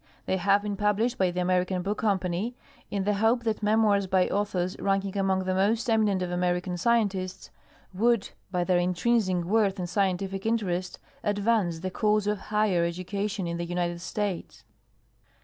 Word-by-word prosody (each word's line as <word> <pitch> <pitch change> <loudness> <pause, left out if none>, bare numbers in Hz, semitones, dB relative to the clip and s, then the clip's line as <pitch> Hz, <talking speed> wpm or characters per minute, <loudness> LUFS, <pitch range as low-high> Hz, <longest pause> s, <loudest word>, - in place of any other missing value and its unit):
They 190 - 0
have 200 +2 +3
been 205 -1 -3
published 215 +5 +1
by 185 - +3
the 180 +1 -2
American 180 0 +1
Book 205 +2 -2
Company 195 +2 -1 0.3
in 200 -1 -1
the 210 +2 +1
hope 225 +4 +2
that 220 -2 -1
memoirs 210 -2 +3
by 185 -1 +3
authors 185 -3 -1
ranking 195 0 0
among 190 -1 +1
the 185 0 -1
most 215 +5 +1
eminent 210 -4 +2
of 180 - -3
American 180 0 0
scien 230 +4 +3
tists 185 -1 -6 0.4
would 230 +2 +1 0.2
by 180 -2 0
their 180 0 +2
intrinsic 185 +1 +1
worth 200 0 +2
and 180 -2 -3
scientific 195 0 -1
interest 185 -5 -1 0.3
advance 205 -5 +1
the 185 +1 -3
cause 210 +1 +1
of 210 -1 0
higher 210 -5 +2
education 190 +3 -3
in 170 0 -3
the 170 - -3
United 175 0 -2
States. 200 -1 -4
195 Hz, 165 wpm, -27 LUFS, 180-210 Hz, 0.4 s, have